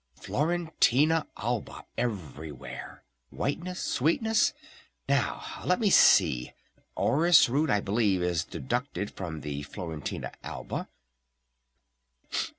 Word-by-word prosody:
Florentina 160 - +1
Alba 120 +1 -3
everywhere! 80 - -5 0.3
Whiteness! 170 - -3
Sweetness! 170 - +2 0.6
Now - - +1 0.2
let 180 - +2
me 210 -4 +2
see, 60 - +5 0.4
orris 165 +3 +5
root 145 +6 +1
I 105 - +3
believe 100 -3 +1
is 85 -2 +1
deducted 100 - -3
from 80 -5 -6
the 70 0 -4
Florentina 80 +1 -5
Alba - - -5
120 Hz, 90 wpm, -28 LUFS, -, 0.6 s, see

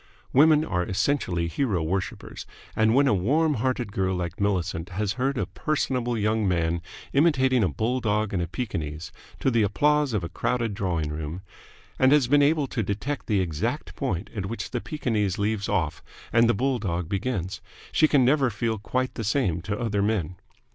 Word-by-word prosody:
Women 155 +3 +6
are 90 - -1
essentially 95 -3 0
hero 90 - 0
worshippers, 95 +4 -4 0.3
and 110 +1 +3
when 140 +1 +5
a - - +4
warm 145 - +2
hearted 125 -3 -1
girl 95 -1 0
like 90 +1 -4
Millicent 90 -4 -1
has 100 +2 -1
heard 135 +3 -1
a 100 - 0
personable 125 +2 -1
young 110 0 +1
man 85 -2 0 0.3
imitating 130 -5 +3
a - - +3
bulldog 110 - 0
and 90 - 0
a 85 - -2
Pekingese 80 -6 -4 0.3
to 135 - +2
the 115 -1 +3
applause 145 +7 +2
of 105 -5 0
a - - -2
crowded 120 -4 -1
drawing 85 -6 -1
room, 80 +4 -5 0.6
and 130 0 +5
has 145 -5 +4
been 145 +3 +4
able 150 0 +3
to 125 -3 -2
detect 110 +8 -3
the 105 -4 +2
exact 80 -4 -3
point 90 +4 -3
at 100 -2 -3
which 115 - -5
the 125 - -2
Pekingese 110 - -1
leaves 105 0 -1
off 80 -7 -1 0.3
and 115 0 +5
the 120 - +3
bulldog 100 - -1
begins, 95 -2 -3 0.3
she 155 - +4
can 140 -4 +4
never 135 0 +3
feel 110 +1 -2
quite 130 +5 -2
the 115 - -4
same 100 - 0
to 100 +3 -3
other 110 -4 0
men. 100 -5 0
105 Hz, 180 wpm, -26 LUFS, 90-130 Hz, 0.6 s, Women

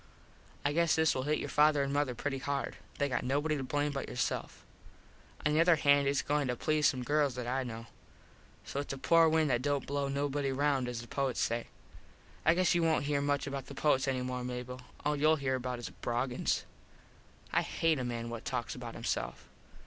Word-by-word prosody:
I 145 - +2
guess 170 0 +3
this 160 0 +3
will 130 - -1
hit 150 - +3
your - - -4
father 150 -1 +4
an 140 0 -2
mother 145 -4 0
pretty 135 +2 -2
hard. 140 +1 -3 0.2
They 140 - +1
got 130 - -1
nobody 145 +4 +1
to 140 - -3
blame 145 +3 0
but 135 -1 -4
yourself. 125 - -3 0.8
On 150 - +3
the 155 - +4
other 170 0 +6
hand 145 -2 +4
its 140 -1 +1
goin 145 -1 0
to 125 - 0
please 155 +3 +2
some 130 -1 0
girls 145 -1 +1
that 125 -1 -4
I 130 +2 0
know. 115 -2 -6 0.8
So 140 - -4
its 145 - -4
a - - -5
poor 165 +4 +5
wind 155 -2 +2
that 120 0 +2
dont 140 -1 0
blow 140 0 -1
nobody 140 0 -1
round 135 -1 +1
as 120 -2 -4
the 120 - -11
poets 135 -2 -1
say. 115 0 0 0.8
I 160 +2 +5
guess 185 0 +3
you 175 - +2
wont 160 -3 +2
here 145 -1 +1
much 145 0 0
about 140 -2 -5
the 140 - -9
poets 135 -2 +2
any 130 -1 0
more, 125 0 -3
Mable. 125 0 -4
About 125 - -14 0.2
all 150 - +2
youll 155 +2 +4
here 130 -2 0 0.2
is 115 -6 -6
Broggins. 120 +1 0 0.9
I - - +4
hate 160 -3 +1
a - - -2
man 115 -1 -4
what 115 -1 -6
talks 125 -3 -3
about - - -7
himself. - - -3
140 Hz, 215 wpm, -32 LUFS, 125-150 Hz, 0.9 s, other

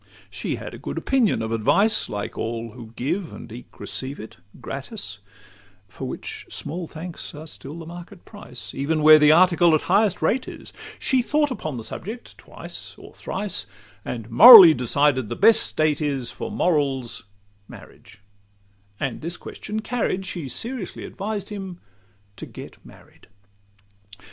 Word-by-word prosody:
She - - -3
had - - -8
a - - -9
good - - -6
opinion 230 - +1
of 110 - -4
advice, 195 - +2
Like 105 -1 -5
all 115 0 -4
who 115 -1 -12
give 165 - -3
and - - -11
eke 120 +2 -12
receive 135 +2 -5
it 110 - -10 0.2
gratis, 135 - -6 0.7
For 105 - -7
which - - -7
small 170 +1 -5
thanks 165 0 -8
are 155 +2 -9
still 155 0 -10
the 165 - -9
market 175 +3 -11
price, 125 - -9
Even 150 +3 -1
where 155 0 +9
the 150 0 +6
article 175 0 +5
at 155 - 0
highest 200 +1 +2
rate 250 +10 +1
is: - - -10 0.2
She 260 -2 +1
thought 295 +3 +1
upon 155 - -5
the 115 - -6
subject 215 - -8
twice - - -9
or - - -14
thrice, 195 -1 -4 0.4
And 115 -3 -6
morally 200 - +11
decided, 130 -1 +1
the - - -3
best 225 +2 +5
state 155 -1 0
is 140 -5 -2
For - - -6
morals, 140 - -1 0.4
marriage; 105 +1 -15 0.8
and 130 - -3
this 170 +3 -4
question 215 +1 -6
carried, 220 -5 -2
She 170 -6 -5
seriously 230 - -5
advised 205 0 -5
him 190 -4 -7 0.6
to - - -8
get - - -12
married. - - -18
160 Hz, 155 wpm, -23 LUFS, 130-200 Hz, 0.8 s, morally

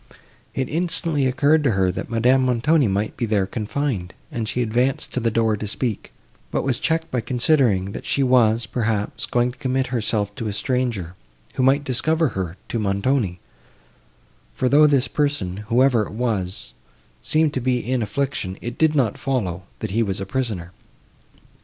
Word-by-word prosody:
It 130 - -1
instantly 165 -3 +1
occurred 145 +4 +3
to 135 -6 +2
her, 95 -1 +2
that 95 - -6
Madame 125 +3 +3
Montoni 130 +3 +3
might 100 +2 -1
be 120 - -2
there 105 -3 +2
confined, 105 -2 -3 0.2
and 110 -2 -3
she 125 - 0
advanced 125 +4 0
to - - 0
the 115 -1 +1
door 110 -1 +2
to 105 +1 -5
speak, 110 +1 -3 0.4
but - - -1
was 130 -3 0
checked 160 0 -1
by 125 - 0
considering, 120 -6 +2
that - - -7
she 140 - +1
was, 120 -3 +3
perhaps, 110 -3 -2
going 120 0 +1
to 125 - -19
commit 130 0 0
herself 105 -3 0
to 115 - -3
a 105 - -2
stranger, 115 -7 -1 0.4
who - - -1
might 135 +3 +4
discover 155 +4 +1
her 95 -4 -4
to 115 - -1
Montoni; 100 -1 0 1.2
for, 130 - +1
though 150 +4 +6
this 140 -3 +2
person, 140 -11 -1
whoever 120 -2 +3
it - - -10
was, 105 -6 -2 0.5
seemed 155 -1 +2
to 130 - -2
be 125 0 +1
in 125 +1 -1
affliction, 105 -4 -2
it 120 +1 -6
did 160 -1 +3
not 125 -7 +1
follow, 95 -9 -2
that 110 - -3
he 115 +4 +1
was 100 -4 -1
a 95 - -3
prisoner. 100 -6 -3
120 Hz, 175 wpm, -22 LUFS, 105-135 Hz, 1.2 s, though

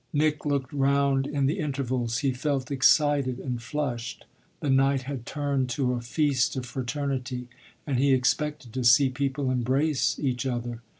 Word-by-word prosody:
Nick 150 0 +1
looked 140 -2 -1
round 140 -1 +2
in 145 -1 0
the 155 +8 0
intervals; 130 -6 -1
he 135 - +3
felt 135 0 -2
excited 135 0 +3
and 125 -3 -4
flushed 120 -2 -4 0.3
the - - -4
night 135 0 +3
had 130 -3 -6
turned 140 -3 -1
to 125 0 0
a 120 - -3
feast 135 +1 +1
of 130 -1 -3
fraternity 125 0 -3 0.4
and 135 -4 0
he 140 +1 +3
expected 130 0 0
to 130 -1 -2
see 125 +3 +6
people 135 0 -1
embrace 130 +4 +1
each 130 -3 -1
other. 120 -2 -3
135 Hz, 160 wpm, -26 LUFS, 125-145 Hz, 0.4 s, see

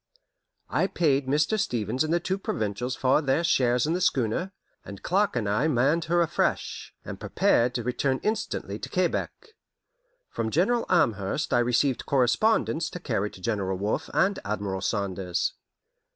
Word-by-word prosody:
I 190 - +2
paid 145 -8 +1
Mr. 150 +10 +1
Stevens 120 - 0
and 155 - -2
the 170 - +3
two 190 +3 -2
Provincials 110 - -2
for 135 +3 +2
their 140 +3 +1
shares 125 -6 +2
in 160 - 0
the 180 - -1
schooner, 140 - 0 0.3
and 100 +1 -10
Clark 200 -1 +1
and 115 -4 -1
I 105 +9 +1
manned 150 +4 +2
her 175 +1 +3
afresh, 165 - -2
and - - -7
prepared 120 +1 +2
to 120 - -1
return 130 +2 0
instantly 220 +1 -2
to - - -6
Quebec. 455 - -2 0.8
From 110 - -3
General 215 - +1
Amherst 130 - +1
I - - +4
received 125 +2 +1
correspondence 155 - +2
to 180 - -7
carry 110 - -1
to 95 - -14
General 95 -3 -1
Wolfe 100 +3 -2
and 195 +1 +2
Admiral 100 -2 -3
Saunders. 95 -3 -1
130 Hz, 155 wpm, -26 LUFS, 110-170 Hz, 0.8 s, I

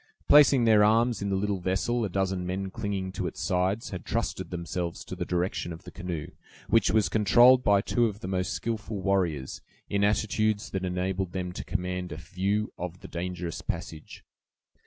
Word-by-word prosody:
Placing 140 -4 +7
their 110 -2 +6
arms 115 +1 +3
in 100 - -1
the 100 - +1
little 100 0 -1
vessel 95 +7 0
a 105 - -1
dozen 95 0 -1
men 95 +1 -3
clinging 100 -4 -3
to 95 -1 -3
its - - -7
sides 95 +4 0
had 95 -3 -6
trusted - - -2
themselves 85 0 -4
to - - -6
the - - -3
direction 90 0 -1
of 85 +2 -9
the - - -10
canoe, 85 -4 -5 0.4
which - - +3
was 110 +2 +3
controlled 120 +4 +5
by 100 -3 +4
two 120 +3 +2
of 105 -1 -6
the - - -5
most 95 -1 -1
skillful 110 -2 -3
warriors, 90 -9 -1 0.3
in 100 0 +1
attitudes 110 +1 +1
that 95 -1 -2
enabled 90 0 -2
them 90 -1 -3
to - - -6
command 90 0 -3
a 75 - -5
view 95 +6 -2
of 90 0 -6
the - - -9
dangerous 90 -1 -4
passage. 80 -1 -6
95 Hz, 185 wpm, -28 LUFS, 90-105 Hz, 0.4 s, Placing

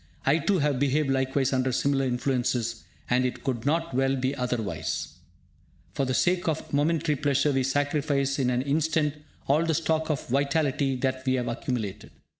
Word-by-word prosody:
I 140 +4 +4
too 195 +5 +1
have 145 -4 +1
behaved 140 +1 +1
likewise 135 0 +1
under 130 0 +1
similar 135 +1 +1
influences, 125 -2 -1 0.2
and 125 +1 +2
it 125 - -3
could 125 -2 -2
not 165 0 0
well 135 +1 +2
be 130 +1 -1
otherwise. 110 - -2 0.8
For 135 - 0
the 130 - 0
sake 180 0 +1
of 160 -1 0
a - - 0
momentary 155 +1 +1
pleasure, 145 0 +1
we 135 -1 +1
sacrifice 140 0 0
in 130 -2 +2
an 125 0 0
instant 150 +1 +1 0.3
all 150 +4 +3
the 165 -1 +1
stock 160 0 0
of 150 -4 -1
vitality 140 0 +1
that 130 0 -1
we 130 - +3
have 125 -2 -1
accumulated. 110 -4 -3
135 Hz, 175 wpm, -27 LUFS, 130-150 Hz, 0.8 s, I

